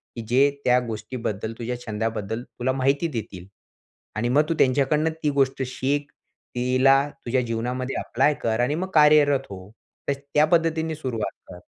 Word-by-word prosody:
की 115 - -5
जे 135 +4 +5 0.2
त्या 125 0 +5
गोष्टीबद्दल 110 -1 -4
तुझ्या 120 +1 -4
छंदाबद्दल 110 +1 -3
तुला 125 +1 -3
माहिती 135 +5 +1
देतील. 95 -5 -7 0.7
आणि 115 +3 -1
मग 145 +5 +4
तू - - +2
त्यांच्याकडून 140 +4 +2 0.2
ती 150 - +2
गोष्ट 135 0 +1
शिक. 140 +3 -2 0.4
तिला 130 +2 +4 0.3
तुझ्या 125 +2 +1
जीवनामध्ये 125 +2 -3
अप्लाय 135 +5 +1
कर 110 0 0
आणि 135 +5 +1
मग 185 +3 -3
कार्यरत 150 -3 +5
हो. 95 0 -9 0.4
तर 140 - +2
त्या 140 +2 +1
पद्धतीने 160 -1 +1
सुरुवात 125 -8 -3 0.2
कर. - - -10
130 Hz, 155 wpm, -24 LUFS, 115-145 Hz, 0.7 s, जे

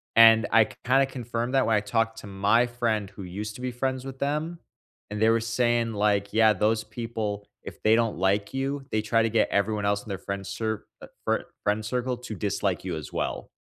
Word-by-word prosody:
And 115 -1 +8
I 115 0 +6
k 130 - -13
kinda 135 +2 +4
confirmed 120 -1 -4
that 135 - +4
when 115 - +3
I 105 - +4
talked 115 +1 0
to - - -10
my 100 +5 +3
friend 115 -4 -1
who 100 0 -10
used 105 +4 -5
to - - -9
be 125 0 -2
friends 130 +1 -2
with 135 -1 -8
them, 150 +4 -2 0.5
and 105 +1 -4
they 110 - +5
were 115 0 +4
saying, 115 0 +1
like, 100 -1 +1
yeah, 110 -1 +5
those 110 +3 +1
people, 110 -4 -4 0.2
if - - -10
they 110 +1 +5
don't 115 -4 +1
like 100 +4 +1
you, 135 +1 -2
they 110 - +1
try 115 +1 +2
to 115 - +1
get 115 - +2
everyone 105 +1 0
else 100 0 +1
in 110 - -12
their 95 - -3
friend 100 0 -5
cir 110 +2 -3 0.2
uh, - - -9 0.2
fri - - +1 0.2
friend 105 +1 +1
circle 125 +1 -1
to 115 -3 -7
dislike 100 -1 -1
you 90 -3 -2
as 75 -3 -7
well. - - -3
110 Hz, 225 wpm, -26 LUFS, 105-120 Hz, 0.5 s, And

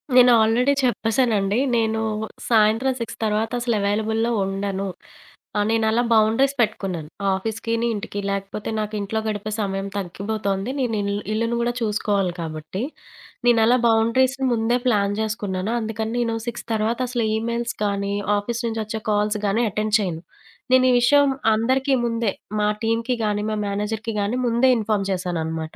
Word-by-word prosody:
నేను 250 -1 +8
ఆల్రెడీ 240 +5 +3
చెప్పేసానండి. 225 -4 +1 0.2
నేను 220 -1 +1 0.5
సాయంత్రం 225 +3 +3
6 225 -1 -5
తర్వాత 215 +1 0
అసలు 235 -1 0
అవైలబుల్‌లో 220 +3 0 0.2
ఉండను. 195 0 -2 0.7
ఆహ్, 205 - +2
నేనలా 225 +1 +2
బౌండరీస్ 225 +6 +3
పెట్టుకున్నాను. 190 -8 -2 0.2
ఆఫీసుకిని, 225 +4 -2
ఇంటికి, 205 -1 -5
లేకపోతే 200 +1 -4
నాకు 215 0 -3
ఇంట్లో 205 +2 -2
గడిపే 215 0 -3
సమయం 195 -1 -2
తగ్గిపోతుంది. 200 +2 -3
నేనిల్ 215 -5 0 0.2
ఇల్లును 230 +2 0
గూడా 240 0 0
చూసుకోవాలి 205 -4 0
కాబట్టి, 160 +4 -5 0.7
నేనలా 235 +1 +5
బౌండరీస్‌ని 255 +4 +2
ముందే 230 +1 +1
ప్లాన్ 205 -3 +2
చేసుకున్నాను. 210 -2 -2
అందుకని 220 0 -3
నేను 230 -1 0
6 240 0 -5
తర్వాత 220 +2 0
అసలు 240 -3 0
ఈమెయిల్స్ 235 +1 -2
కానీ, 200 0 -1 0.2
ఆఫీసు 235 +4 -3
నుంచొచ్చే 220 -1 -3
కాల్స్ 210 +1 +1
గానీ 215 +4 +1
అటెండ్ 215 +1 0
చేయను. 175 -5 -3 0.5
నేనీ 255 0 +6
విషయం 285 +4 +5 0.3
అందరికీ 260 +5 +1
ముందే 230 -3 0 0.3
మా 210 - +2
టీమ్‌కి 230 +2 0
గాని, 210 0 0
మా 215 - -1
మేనేజర్‌కి 210 +2 -3
గాని 220 +5 -1
ముందే 235 +3 +3
ఇన్ఫార్మ్ 210 -2 0
చేశాననమాట. 160 -4 -3
220 Hz, 135 wpm, -22 LUFS, 200-230 Hz, 0.7 s, నేను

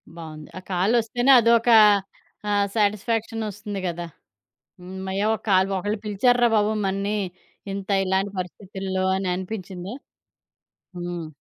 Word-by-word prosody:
బావుంది. 155 -2 -9
ఆ - - -4
కాలొస్తేనే 230 +7 +2
అదొకా 230 0 +5 0.7
ఆహ్, 205 -1 +2
సాటిస్ఫాక్షనొస్తుంది 210 -1 -1
కదా! 175 0 -4 0.8
హమ్మయ్యా! 190 +2 -3
ఒక - - -7
కా 190 - +5 0.2
ఒకళ్ళు 205 +3 -2
పిలిచారు 210 +4 +2
రా 240 - +6
బాబు 210 +1 +2
మనని 200 +2 -1 0.9
ఇలాంటి 190 +1 0
పరిస్థితుల్లో 190 +1 -4
అననిపిచ్చిందా? 185 +1 -4 1.0
హ్మ్. 175 -1 -5
200 Hz, 100 wpm, -24 LUFS, 185-215 Hz, 1.0 s, రా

